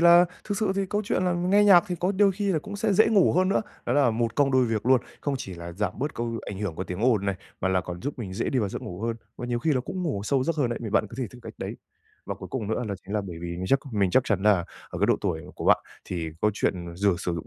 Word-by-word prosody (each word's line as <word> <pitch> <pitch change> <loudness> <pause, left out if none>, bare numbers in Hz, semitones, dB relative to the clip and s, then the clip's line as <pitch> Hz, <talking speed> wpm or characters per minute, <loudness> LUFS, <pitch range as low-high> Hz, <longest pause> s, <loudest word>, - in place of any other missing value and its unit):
là 170 +1 +8 0.2
thực 205 -1 -2
sự 210 -3 +1
thì 195 -1 0
câu 210 +1 0
chuyện 185 - 0
là 180 - +2
nghe 185 +4 +3
nhạc 185 -3 +7
thì 180 - -1
có 185 +3 +1
đôi 200 0 +4
khi 200 0 0
là 160 - +2
cũng 205 +6 -7
sẽ 210 0 +1
dễ 215 +3 +5
ngủ 205 -4 +4
hơn 185 +1 +3
nữa, 200 - +2 0.2
đó 120 - +1
là 140 -4 +4
một 115 0 -1
công 140 -2 +3
đôi 130 -1 +5
việc 115 +1 -2
luôn. 130 -1 +5 0.2
Không 145 -1 -1
chỉ 95 -6 -6
là 85 0 -7
giảm 100 +1 -1
bớt 145 +3 -2
câu 115 -1 -3
ảnh 100 -1 -5
hưởng 100 -6 -3
của 95 - -4
tiếng 90 +2 -5
ồn 110 -5 +3
này, 100 - +1 0.3
mà 95 - +1
là 95 -1 +2
còn 90 -1 -7
giúp 140 -1 -4
mình 95 -5 -5
dễ - - -1
đi 130 - +1
vào 105 -4 +1
giấc - - -6
ngủ 90 +1 -7
hơn, 115 0 -1 0.2
và 120 - -5
nhiều 120 -1 -1
khi 155 +5 +1
là 130 - +2
cũng 185 +8 -5
ngủ 135 - -1
sâu 140 - +2
vào 130 - 0
giấc 165 0 0
hơn 130 -5 +1
đấy, 120 - -2
thì 110 - -4
bạn 110 - +2
có - - -11
thể 125 - -1
thử 125 - -13
cách - - -9
đấy. - - -5 0.5
Và - - -3
cuối - - -9
cùng 110 -6 -3
nữa 115 +2 -1
là 100 - -2
chính 100 - -6
là 105 - +2
bởi 85 -2 -7
vì 85 - -5
mình 95 +1 -4
chắc 135 - +4
mình 100 -3 +2
chắc 130 - +4
chắn 100 -3 0
là 100 -5 +4 0.3
ở - - -5
cái - - +3
độ - - +4
tuổi 80 - -1
của - - -6
bạn - - +6 0.3
thì 85 -3 -4
câu 105 - +4
chuyện 85 -4 -2
dừ 100 -1 +3
sử 90 - -2
dụng 85 - -5
120 Hz, 325 wpm, -26 LUFS, -, 0.5 s, là